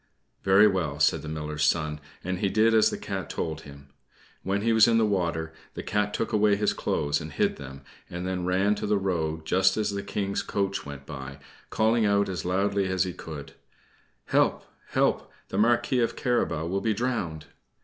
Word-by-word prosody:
"Very 95 +2 +6
well," 85 -8 0
said 70 - +3
the - - -8
Miller's 75 -1 -3
son, 75 0 +1 0.2
and 90 0 -2
he 100 - +1
did 110 +3 +3
as 110 -1 +5
the - - -4
Cat - - -5
told 80 -1 -3
him. 70 -1 -13 0.5
When 100 +1 -1
he 115 0 +3
was 110 0 +7
in 115 -1 +4
the 115 - +4
water, 85 -5 -1 0.2
the - - -5
Cat 105 0 0
took 115 +2 -3
away 105 -1 +4
his 105 0 +1
clothes 75 +2 -1
and 80 0 -7
hid - - 0
them, 70 -1 -10 0.3
and 90 +1 -5
then 90 -1 -2
ran 95 +3 +2
to 105 - -4
the 105 0 +2
road, 80 -5 -2
just 95 +3 +3
as 105 -1 0
the 100 0 -3
King's 100 0 -2
coach 100 -5 -2
went 70 -1 -8
by, 70 -2 -8 0.3
calling 110 +1 +2
out 100 -1 +2
as 90 -4 -4
loudly 100 +2 +1
as 95 0 +1
he 90 -2 -4
could 75 -4 -8 0.7
"Help, - - +2 0.2
help! - - 0 0.2
The - - -2
Marquis 120 +3 +3
of 115 - +1
Carabas 120 - 0
will 95 +3 -1
be 110 0 0
drowned." 95 -10 -2
95 Hz, 195 wpm, -27 LUFS, 80-105 Hz, 0.7 s, was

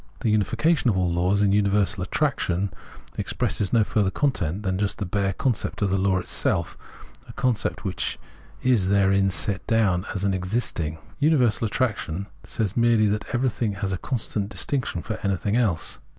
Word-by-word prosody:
The 115 -5 +1
unification 115 - +2
of 100 - +1
all 90 -2 +1
laws 90 +4 +2
in 100 - +3
universal 100 -1 +2
attraction 95 - 0 0.5
expresses 100 - -1
no 115 -2 +4
fiu'ther 105 -2 +1
content 100 - -1
than 95 -2 -1
just 105 -1 0
the 100 - -3
bare 100 +1 0
concept 110 0 -1
of 100 - +1
the 95 - +2
law 95 0 +2
itself, - - 0 0.5
a - - -9
concept 125 -4 -1
which - - -2 0.5
is 120 -7 +3
therein 100 -1 +3
set 95 +3 -1
doAvn 100 -5 +2
as 100 - -2
exist 95 +3 -1
ing. 80 -1 -2 0.2
Universal 130 -7 +3
attraction 105 -7 -1 0.2
says 105 -3 -2
merely 115 -2 +4
that 105 +1 -1
everything 120 -3 0
has 100 -1 -3
a - - -1
constant 105 -5 -2
distinction 120 - -1
for 110 - -4
anything 100 +2 0
else. 105 -10 0
100 Hz, 165 wpm, -24 LUFS, 95-115 Hz, 0.5 s, no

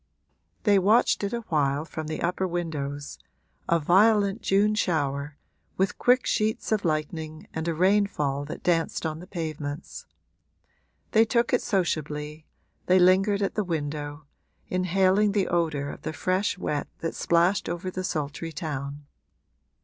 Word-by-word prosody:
They 205 -3 +5
watched 210 +4 +3
it 200 - -1
a 235 - -2
while 150 -6 0
from 160 -1 -6
the 155 - -4
upper 180 +2 0
windows 145 -5 -4 0.5
a 170 - +4
violent 200 +5 +3
June 205 +2 +3
shower, 145 -7 -1 0.4
with 195 +2 0
quick 250 +1 +4
sheets 215 +1 0
of 215 -2 +1
lightning 155 -1 -3
and 160 +1 -3
a 165 - 0
rainfall 180 -7 +1
that 150 - -8
danced 165 -1 0
on 155 0 -3
the 180 - -11
pavements. 155 -3 -5 1.0
They 220 -1 +6
took 235 +2 +1
it 250 - +3
sociably, 155 -5 -2 0.4
they 185 - +5
lingered 195 +3 +4
at 195 - -1
the 210 - 0
window, 145 -3 -4 0.4
inhaling 190 +3 +2
the 200 -3 +1
odour 160 -5 0
of - - -8
the - - -4
fresh 185 +5 0
wet 150 -5 -2
that 165 - -2
splashed 175 +4 +2
over 175 +2 -3
the 185 +1 -4
sultry 155 0 -3
town. 145 -3 -5
170 Hz, 145 wpm, -26 LUFS, 150-195 Hz, 1.0 s, They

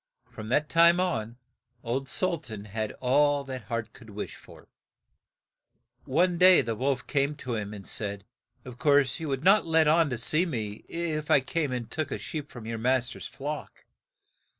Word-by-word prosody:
From 110 0 -8
that 150 +4 +2
time 170 +2 +5
on 120 -11 -2 0.5
old 130 +3 -3
Sul 175 0 0
tan 110 -6 -9
had 110 +1 -3
all 145 +2 +2
that 130 -5 -7
heart 115 0 -4
could 115 -3 -15
wish 105 0 -6
for. - - -16 1.4
One 170 +5 +1
day 185 0 +8
the 115 - -2
wolf 135 +2 -1
came 140 +1 0
to 130 -4 -5
see 110 - -1
him, 105 -1 -6
and 100 -2 -9
said, 100 -2 -3 0.4
"Of 125 0 -10
course 140 -1 +3
you 160 - -4
would 135 0 -2
not 195 +1 +5
let 160 -1 +4
on 160 0 +4
to 125 - -3
see 155 +9 +2
me 110 -8 -5
if 160 -3 -3
I - - +6
came 145 +2 -2
and 125 -2 -3
took 155 +4 -3
a - - -3
sheep 150 -2 -6
from 120 -3 -10
your 115 0 -4
mas 125 +1 +1
ter's - - -8
flock. 145 +1 -7
135 Hz, 190 wpm, -27 LUFS, 115-155 Hz, 1.4 s, day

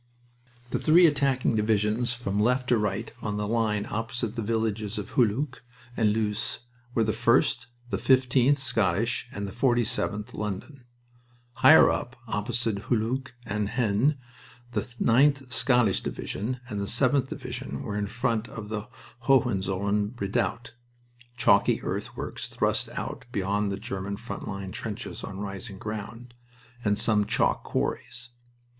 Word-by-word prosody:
The - - 0
three 170 +3 +6
attacking 135 -6 +2
divisions 110 +2 +1
from 110 -5 -2
left 125 +4 +2
to 120 - +5
right 105 +2 -2
on 105 -2 -2
the 105 0 -1
line 110 -2 +1
opposite 115 +1 -3
the 115 - -2
villages 110 -1 -1
of - - -5
Hulluch 125 +3 +1 0.3
and 110 -2 +3
Loos 105 -1 -1 0.3
were 115 - +4
the 110 - +1
1st, 120 +3 +2 0.2
the - - 0
15th 130 +1 +4
(Scottish), 115 -3 0
and 100 -5 -4
the - - -6
47th 120 -1 0
(London). 105 +6 -5 0.7
Higher - - +8
up, 125 - -3
opposite 110 -1 -2
Hulluch 125 +3 -1
and 105 -1 -1
Haisnes, 120 +4 +2 0.5
the 110 -3 0
9th 130 +3 +2
(Scottish) 125 -8 +3
Division 125 +5 -4
and 105 -4 -3
the - - -1
7th 130 +5 +3
Division 125 +2 -5
were 105 -6 -4
in 105 0 -1
front 115 +1 -1
of 105 -2 -8
the 105 0 -4 0.4
Hohenzollern 105 -4 +2
redoubt 105 +4 -1 0.6
(chalky 100 -4 +4
earthworks - - -4
thrust - - 0
out - - -5
beyond 100 -1 0
the 100 - -2
German 100 0 -4
front 120 +4 -7
line 95 -2 -5
trenches, 110 +4 -6
on 95 -1 -6
rising 100 +1 -6
ground) 110 +2 -6 0.5
and 105 -1 +2
some 105 -2 +3
chalk - - +2
quarries. 120 +1 -2
110 Hz, 140 wpm, -27 LUFS, 105-125 Hz, 0.7 s, Higher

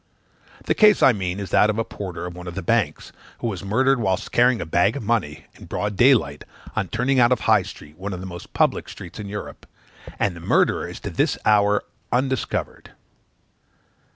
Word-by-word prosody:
The - - +2
case 210 -2 +5
I 130 - +7
mean 95 -2 -3
is 100 -3 -6
that 105 - +4
of 110 - -1
a 115 - +1
porter 90 -6 -7
to 90 - -8
one 90 0 -9
of 85 - -6
the 95 - -4
banks, - - 0 0.3
who - - -7
was 100 -6 -3
murdered 130 +6 +2
whilst 95 -5 -1
carrying 120 0 +3
a - - -4
bag 85 +7 +2
of 140 - -5
money, 105 -10 -1
in - - -14
broad 105 0 -3
daylight, 110 - +3 0.3
on 95 - -1
turning 125 +7 +1
out 120 0 +5
of 125 - +4
the - - -10
High 110 -2 +4
Street, 75 -3 -12
one 100 +2 -4
of 90 - -5
the 95 - -7
most 85 -2 -9
public - - +1
streets 90 - -10
in 100 -1 -6
Europe, 105 +1 -8 0.5
and 95 -4 0
the - - -9
murderer 85 - +1
is - - -8
to - - -5
this - - 0
hour 105 -1 +3 0.3
undiscovered. 130 0 -2
105 Hz, 210 wpm, -22 LUFS, 90-120 Hz, 0.5 s, I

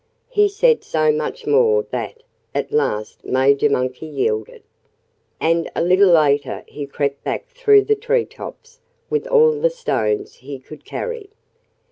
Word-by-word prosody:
He 415 -4 +3
said 460 +4 +2
so 155 -1 +1
much 280 - -4
more 450 +1 +3
that 460 0 -5 0.3
at - - -2
last 110 - -1
Major 140 +3 +2
Monkey 130 +3 -2
yielded. 110 -7 -2 0.8
And 165 +1 +1
a - - 0
little 185 +3 +5
later 145 -4 +2
he 145 -1 -7
crept 140 0 -3
back - - -4
through 445 -5 +4
the 435 - +2
tree 470 +2 0
tops - - -11 0.3
with 450 - -1
all 470 -1 +5
the 460 +2 +1
stones 110 - -2
he 140 +2 -8
could 145 +3 -14
carry. 470 -5 -5
180 Hz, 145 wpm, -20 LUFS, -, 0.8 s, little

